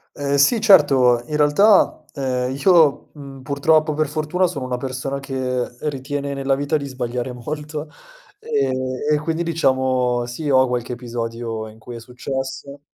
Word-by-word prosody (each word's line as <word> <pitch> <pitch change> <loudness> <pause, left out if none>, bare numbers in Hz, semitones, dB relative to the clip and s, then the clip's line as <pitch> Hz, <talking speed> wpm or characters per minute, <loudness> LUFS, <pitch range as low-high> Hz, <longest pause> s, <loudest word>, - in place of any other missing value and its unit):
Ehm, 140 -1 -2
sì, 140 - +4
certo, 135 - +5
in 150 - -3
realtà, 155 +3 +4
ehm, 130 -2 -2
io, 160 0 +3
mhmm, 140 -2 -11
purtroppo 155 +3 +2
o - - -4
per 155 0 0
fortuna 155 +5 0
sono 145 -7 -5
una 125 -1 -2
persona 130 +2 -4
che 130 -2 -2 0.2
ritiene 140 0 -4
nella 135 0 0
vita 145 +3 -1
di 140 -2 -3
sbagliare 125 -1 -4
molto, 150 +4 -6 0.5
ehm, 440 - 0 0.4
e 150 - +3
quindi 160 +2 -2
diciamo, 130 -6 +1
sì 145 +5 -4
ho 130 -1 +5
qualche 125 0 -3
episodio 115 -2 -5
in 110 - -15
cui 120 +1 -9
è - - -8
successo. 135 +3 -6
135 Hz, 160 wpm, -21 LUFS, 125-150 Hz, 0.5 s, certo